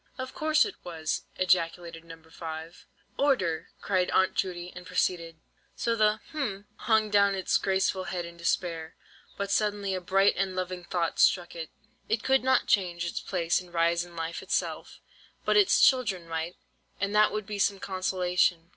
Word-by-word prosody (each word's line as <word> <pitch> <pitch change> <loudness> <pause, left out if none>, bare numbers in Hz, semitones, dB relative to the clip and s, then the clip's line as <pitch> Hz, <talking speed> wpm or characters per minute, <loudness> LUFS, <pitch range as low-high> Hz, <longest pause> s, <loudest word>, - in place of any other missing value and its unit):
"Of 260 0 -6
course 310 -3 +3
it 420 - -5
was!" 160 -2 -3
ejaculated 170 -2 0
No. 165 -1 -11
5. 160 0 -8 0.3
"Order!" 190 - +1
cried 185 -2 +1
Aunt 190 - +3
Judy, 180 -2 -3
and 180 - -8
proceeded:— 165 -2 -1 0.4
"So 230 0 0
the—hm—hung 215 -2 0
down 200 -1 +4
its 190 - 0
graceful 190 -1 0
head 175 -1 -3
in 170 0 -10
despair, 170 -1 -2 0.4
but 200 0 -3
suddenly 205 -1 0
a 185 - -2
bright 195 +3 +3
and 190 0 -1
loving 185 -1 -3
thought 170 -2 -2
struck 175 -2 +3
it. 165 -1 -6 0.4
It 220 -1 0
could 265 0 +3
not 260 0 +3
change 175 -4 +1
its 170 - -3
place 170 -2 0
and 180 -1 -15
rise 170 0 +2
in 175 -1 -13
life 165 0 -4
itself, - - -3 0.5
but - - +2
its 410 -2 +5
children 210 -10 +3
might, 165 +2 -3 0.4
and 200 +1 -1
that 210 0 +5
would 215 -1 -3
be 205 0 -5
some 200 0 +2
consolation. 180 -3 0
185 Hz, 165 wpm, -28 LUFS, 170-205 Hz, 0.5 s, its